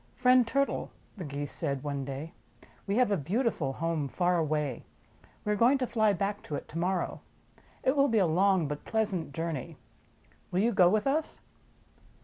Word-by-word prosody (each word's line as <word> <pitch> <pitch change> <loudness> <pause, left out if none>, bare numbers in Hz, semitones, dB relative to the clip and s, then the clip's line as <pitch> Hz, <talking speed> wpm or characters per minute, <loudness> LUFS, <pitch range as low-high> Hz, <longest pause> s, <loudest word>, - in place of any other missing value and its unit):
"Friend 250 -1 +5
Turtle," 275 +3 0 0.3
the 190 - -6
Geese 145 -1 -5
said 140 -5 -2
one 140 -2 -3
day, 140 +4 -6 0.5
"we 200 - 0
have 245 -2 +3
a 200 - +3
beautiful 175 - -1
home 165 -1 -1
far 180 +4 +1
away. 150 -5 -1 0.6
We 210 - +1
are - - +2
going 240 +6 +4
to 260 - -1
fly 220 -3 +2
back 200 +2 -2
to 150 - -4
it - - -6
to 165 - -5
morrow 180 +1 -1 0.6
It 260 - +2
will 280 0 +4
be 225 - +2
a 195 - +4
long 180 0 +3
but 150 +1 -5
pleasant 205 -9 -1
jour 165 +4 -2
ney. 155 +3 -6 0.7
Will 180 - +1
you 235 +3 +3
go 185 -4 +5
with 210 +2 +1
us?" 300 +3 -1
180 Hz, 185 wpm, -29 LUFS, 150-220 Hz, 0.7 s, Friend